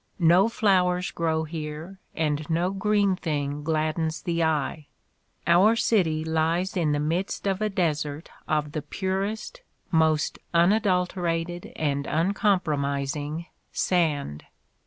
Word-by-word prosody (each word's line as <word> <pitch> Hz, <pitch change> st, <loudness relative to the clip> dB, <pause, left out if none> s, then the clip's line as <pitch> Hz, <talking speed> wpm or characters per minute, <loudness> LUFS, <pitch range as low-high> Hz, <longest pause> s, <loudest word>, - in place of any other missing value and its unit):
No 180 Hz, +4 st, +5 dB
flowers 180 Hz, -5 st, +2 dB
grow 160 Hz, -1 st, 0 dB
here, 160 Hz, +3 st, -6 dB, 0.2 s
and 155 Hz, -1 st, -1 dB
no 170 Hz, +3 st, +1 dB
green 200 Hz, 0 st, +2 dB
thing 145 Hz, -4 st, -2 dB
gladdens 155 Hz, +1 st, -1 dB
the 170 Hz, -1 st, 0 dB
eye.... 155 Hz, -1 st, -1 dB, 0.6 s
Our 180 Hz, +8 st, +5 dB
city 170 Hz, -9 st, +2 dB
lies 165 Hz, +4 st, 0 dB
in 165 Hz, -5 st, +1 dB
the 145 Hz, -, +1 dB
midst 170 Hz, +8 st, -2 dB
of 195 Hz, 0 st, 0 dB
a 215 Hz, -, +1 dB
desert 155 Hz, -5 st, -2 dB, 0.2 s
of 150 Hz, -1 st, 0 dB
the 155 Hz, -, -3 dB
purest 195 Hz, -, -3 dB, 0.2 s
— -, -, -45 dB
most 160 Hz, -2 st, +2 dB, 0.2 s
un 170 Hz, +3 st, +5 dB
adulterated 180 Hz, -4 st, -1 dB
and 140 Hz, -2 st, -1 dB
uncompromising 155 Hz, -5 st, 0 dB, 0.2 s
— -, -, -45 dB, 0.2 s
sand." 150 Hz, -, 0 dB
165 Hz, 125 wpm, -26 LUFS, 150-185 Hz, 0.6 s, No